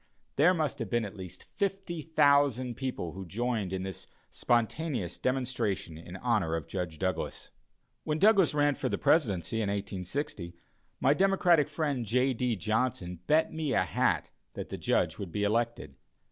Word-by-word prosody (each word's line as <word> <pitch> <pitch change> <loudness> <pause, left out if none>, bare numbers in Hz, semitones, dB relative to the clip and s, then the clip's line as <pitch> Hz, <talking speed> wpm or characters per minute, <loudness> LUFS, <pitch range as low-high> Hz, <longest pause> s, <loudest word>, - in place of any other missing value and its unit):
There 175 +6 +5
must 150 -4 -1
have 115 -5 -3
been 120 0 +1
at 100 - -8
least 95 -3 -8
fifty 195 -4 -2
thousand 140 -5 +3
people 125 -9 -4
who 95 +3 -7
joined 110 0 -2
in 95 -1 -2
this 95 -3 -6 0.2
spontaneous 120 - 0
demonstration 125 -9 -1
in 85 +3 -10
honor 105 -7 0
of 80 -3 -3
Judge 90 -4 -4
Douglas. 95 +1 -3 0.5
When 150 - -1
Douglas 195 -4 +5
ran 145 0 +3
for - - -2
the - - -1
presidency 110 - +2
in 110 -3 0
1860, 100 - -4 0.4
my 140 - +4
democratic 175 -4 +3
friend, 145 -5 -1
J. 125 +4 +2
D. 125 -1 0
Johnson, 105 -3 -1
bet 155 +1 +3
me 155 -3 -1
a - - +3
hat - - 0 0.2
that - - -6
the - - -5
Judge - - +1
would 95 -4 -5
be 105 +4 -1
elected. 115 - 0
120 Hz, 160 wpm, -30 LUFS, 95-145 Hz, 0.5 s, There